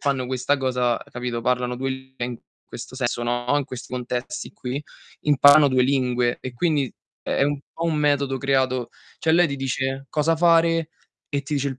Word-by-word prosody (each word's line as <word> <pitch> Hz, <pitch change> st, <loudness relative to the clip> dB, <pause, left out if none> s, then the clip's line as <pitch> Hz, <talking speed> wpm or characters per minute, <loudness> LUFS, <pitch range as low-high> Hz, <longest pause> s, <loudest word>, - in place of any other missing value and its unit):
fanno 135 Hz, -3 st, 0 dB
questa 130 Hz, +3 st, 0 dB
cosa, 125 Hz, -3 st, +1 dB, 0.2 s
capito, 120 Hz, -1 st, -3 dB
parlano 125 Hz, 0 st, 0 dB
2 135 Hz, +1 st, -2 dB
lin 130 Hz, 0 st, -8 dB
eh, -, -, +1 dB
in 120 Hz, -2 st, -6 dB, 0.3 s
questo 115 Hz, +2 st, -9 dB
sen 125 Hz, -3 st, 0 dB
sono 120 Hz, +1 st, -2 dB
in 145 Hz, -, -2 dB
questi 130 Hz, -3 st, -9 dB
contesti 125 Hz, 0 st, -4 dB
qui, 130 Hz, +3 st, -4 dB, 0.4 s
imparano 145 Hz, 0 st, +7 dB
2 130 Hz, -1 st, +3 dB
lingue 125 Hz, -2 st, +1 dB
e 130 Hz, -, -6 dB
quindi 150 Hz, 0 st, +1 dB, 0.4 s
è -, -, -5 dB
è -, -, +5 dB
un 145 Hz, 0 st, 0 dB
po' 165 Hz, -, -3 dB
un 165 Hz, -2 st, +1 dB
metodo 140 Hz, -2 st, +1 dB
creato 130 Hz, -2 st, +1 dB, 0.3 s
cioè, 160 Hz, -, +1 dB
lei 175 Hz, +1 st, +5 dB
ti 140 Hz, -, -3 dB
dice 135 Hz, +1 st, -2 dB
cosa 160 Hz, +2 st, +1 dB
fare, 165 Hz, -1 st, +4 dB, 0.4 s
e 140 Hz, -1 st, -2 dB
ti 145 Hz, +2 st, -3 dB
dice 140 Hz, 0 st, 0 dB
il 130 Hz, -1 st, -7 dB
135 Hz, 195 wpm, -23 LUFS, 125-145 Hz, 0.4 s, imparano